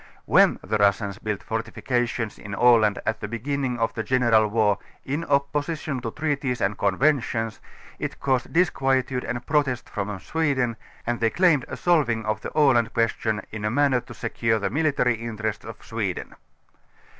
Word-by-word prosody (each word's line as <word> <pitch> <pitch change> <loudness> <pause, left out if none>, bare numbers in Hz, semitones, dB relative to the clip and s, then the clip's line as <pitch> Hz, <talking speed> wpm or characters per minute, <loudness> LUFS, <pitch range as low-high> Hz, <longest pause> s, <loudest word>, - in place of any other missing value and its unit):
When - - +5
the 110 - -1
Russians 100 0 +2
built 105 -3 -3
fortifications 120 0 -2
in 105 0 -6
Aland 110 -3 +5
at 110 0 -1
the - - -4
beginnig 125 +3 -2
of 115 -1 0
the 110 - -3
general 115 -1 +3
war, 105 -2 +2 0.3
in 145 +5 -2
opposition 145 0 -1
to 115 - -3
treaties 140 -2 -2
and 100 +2 0
conventions, 115 +1 +1 0.4
it - - -4
caused 130 -2 0
disquietude 135 -7 +1
and 120 +1 -4
jjrotests 140 -5 0
from 100 -1 -4
Sweden 135 - 0 0.3
and 120 0 -1
thej' 115 -1 +1
claimed 170 -8 +4
a - - -6
solving 130 -11 +2
of 110 0 -1
the - - -5
Aland 120 -7 +4
question 110 -2 0
in 105 -1 -6
a 105 - +1
manner 130 +1 +2
to 120 - -12
secure 115 -1 0
the 100 - -2
militarj^ 135 -5 +1
interests 110 -2 -4
of 110 0 -10
Sweden. 105 -6 -3
120 Hz, 160 wpm, -24 LUFS, 110-135 Hz, 0.4 s, When